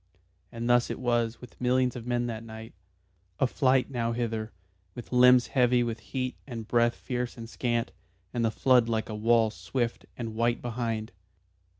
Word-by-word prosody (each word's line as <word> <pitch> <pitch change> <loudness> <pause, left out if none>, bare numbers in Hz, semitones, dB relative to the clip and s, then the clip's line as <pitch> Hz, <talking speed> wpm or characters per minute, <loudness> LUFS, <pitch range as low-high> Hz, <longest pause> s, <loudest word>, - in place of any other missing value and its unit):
And 115 0 -4
thus 120 0 +4
it - - -3
was 120 -2 0
with 125 -1 -13
millions 125 0 +2
of 120 -1 -7
men 120 0 0
that 115 -2 -4
night 110 0 -10 0.7
a - - +4
flight 130 +1 +2
nowhither, 115 -2 -2 0.4
with 120 - -9
limbs 125 -1 +6
heavy 125 0 +3
with 115 -1 -3
heat 130 +3 -4
and 115 -4 -6
breath 120 0 +3
fierce 125 -1 -4
and 115 -1 -7
scant, 120 0 -1 0.4
and 120 - 0
the 115 - +3
flood 125 0 +3
like 110 -1 -1
a - - -4
wall 115 0 +3
swift 120 +1 -3
and 115 -2 -4
white 115 +1 +1
behind. 115 -3 -3
120 Hz, 170 wpm, -28 LUFS, 115-125 Hz, 0.7 s, limbs